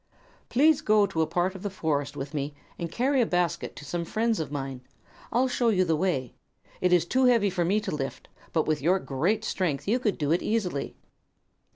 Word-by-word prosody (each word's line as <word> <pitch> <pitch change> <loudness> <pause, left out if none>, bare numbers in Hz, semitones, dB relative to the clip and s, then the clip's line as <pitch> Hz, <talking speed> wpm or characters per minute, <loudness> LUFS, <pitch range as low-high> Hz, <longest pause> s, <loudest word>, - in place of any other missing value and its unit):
"Please 300 +4 +4
go 210 -1 +4
to 180 -5 -1
a 160 - +2
part 180 +2 0
of 190 - -9
the 205 - -2
forest 145 -6 -2
with 140 +2 -5
me 145 0 -3 0.2
and 170 -1 -4
carry 260 +6 +2
a - - +3
basket 175 -1 -1
to 145 - -10
some 170 +4 -2
friends 220 +5 0
of 155 - -3
mine. 135 -3 -4 0.5
I'll 255 +2 +3
show 245 -2 +1
you 185 -4 +3
the 165 -2 +2
way. 150 -7 -1 0.5
It 180 - +2
is 175 -2 +4
too 260 +8 +2
heavy 230 -5 +4
for 180 -1 0
me 195 +5 +2
to 190 -7 -3
lift, 135 -2 -5 0.2
but 160 - +1
with 155 -2 0
your 175 +6 +3
great 190 +8 -1
strength 175 -9 -1
you 235 +5 +2
can 215 -6 0
do 145 -1 -1
it 170 - +2
easily." 195 -10 -1
180 Hz, 215 wpm, -27 LUFS, 150-215 Hz, 0.5 s, Please